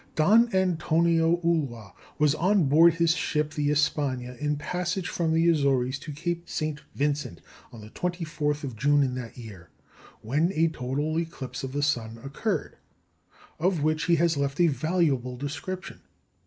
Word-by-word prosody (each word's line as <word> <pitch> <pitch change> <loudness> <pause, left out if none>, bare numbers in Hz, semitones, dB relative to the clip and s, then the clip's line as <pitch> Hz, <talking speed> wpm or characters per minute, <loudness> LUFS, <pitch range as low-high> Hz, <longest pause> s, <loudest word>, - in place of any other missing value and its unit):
Don 220 +9 +5
Antonio 170 -2 +2
Ulloa 135 -11 -1 0.2
was 150 -1 +3
on 185 +4 +2
board 160 +4 +5
his 165 -1 +3
ship 150 -2 -1
the 145 -1 0
Espagne 140 -4 0
in 150 0 0
passage 180 +4 -3
from 165 -2 -1
the 165 +1 +3
Azores 135 -4 +1
to 150 - -8
Cape 170 +3 -4
St. 155 -2 -3
Vincent 140 - -1 0.3
on 115 - -11
the 105 +1 -12
24th 155 -4 -2
of 130 -5 -5
June 145 +5 +3
in 130 -2 -1
that 125 -2 -7
year, 100 -8 -11 0.5
when 150 - +1
a 165 +1 +2
total 145 +3 -2
eclipse 160 -7 -6
of 135 - -4
the 145 +1 -2
sun 115 -6 -1
occurred, 150 +6 -3 0.8
of 175 -2 +1
which 155 0 +1
he 175 - +4
has 165 -1 +2
left 140 +1 -2
a 175 - +6
valuable 145 -4 0
description. 145 +7 -6
150 Hz, 155 wpm, -26 LUFS, 135-170 Hz, 0.8 s, a